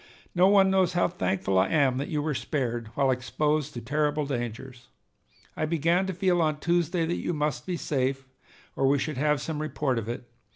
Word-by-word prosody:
No 180 Hz, +1 st, +5 dB
one 195 Hz, -1 st, +5 dB
knows 185 Hz, -2 st, +2 dB
how 175 Hz, -, +3 dB
thankful 95 Hz, -, 0 dB
I 95 Hz, -, +3 dB
am 135 Hz, -5 st, +2 dB
that 140 Hz, -, -3 dB
you 150 Hz, -2 st, -2 dB
were 155 Hz, 0 st, -1 dB
spared, 120 Hz, -4 st, -2 dB
while 135 Hz, -2 st, +3 dB
exposed 150 Hz, +3 st, -1 dB
to 120 Hz, -, -5 dB
terrible 150 Hz, +4 st, 0 dB
dangers. 120 Hz, -1 st, -5 dB, 0.7 s
I 155 Hz, -, -1 dB
began 170 Hz, +4 st, +1 dB
to 190 Hz, -, -2 dB
feel 180 Hz, -2 st, +2 dB
on 155 Hz, -2 st, 0 dB
Tuesday 170 Hz, 0 st, +1 dB
that 170 Hz, +2 st, -2 dB
you 175 Hz, -, -2 dB
must 150 Hz, -5 st, -2 dB
be 180 Hz, -2 st, -2 dB
safe, 135 Hz, -2 st, -1 dB, 0.5 s
or 135 Hz, -, +2 dB
we 140 Hz, +1 st, +4 dB
should 150 Hz, 0 st, -3 dB
have 150 Hz, +1 st, +2 dB
some 150 Hz, -1 st, -3 dB
report 140 Hz, -4 st, -1 dB
of 115 Hz, 0 st, -6 dB
it. 120 Hz, 0 st, -5 dB
150 Hz, 200 wpm, -27 LUFS, 130-165 Hz, 0.7 s, No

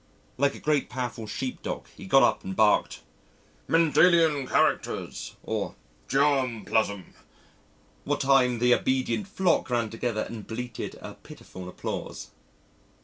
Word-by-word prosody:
Like 140 Hz, 0 st, +2 dB
a -, -, -9 dB
great 150 Hz, -2 st, 0 dB
powerful 125 Hz, -3 st, -4 dB
sheep 105 Hz, +5 st, -4 dB
dog, -, -, -5 dB
he 95 Hz, -, -10 dB
got 135 Hz, +7 st, +6 dB
up -, -, +2 dB
and 95 Hz, 0 st, -5 dB
barked, 105 Hz, +1 st, +2 dB, 0.7 s
"Mendelian 165 Hz, -3 st, +4 dB
characters," -, -, -1 dB
or -, -, -3 dB, 0.3 s
"Germ 135 Hz, -6 st, +1 dB
plasm," 100 Hz, -2 st, -1 dB, 0.9 s
what 145 Hz, 0 st, -1 dB
time 130 Hz, -3 st, +4 dB
the 125 Hz, +1 st, +4 dB
obedient 130 Hz, -, 0 dB
flock 190 Hz, -7 st, +1 dB
ran 120 Hz, -3 st, 0 dB
together 115 Hz, -1 st, -2 dB
and 110 Hz, -3 st, -8 dB
bleated 120 Hz, 0 st, -5 dB
a -, -, -8 dB
pitiful 90 Hz, -1 st, -11 dB
applause. -, -, -6 dB
125 Hz, 130 wpm, -27 LUFS, 110-140 Hz, 0.9 s, got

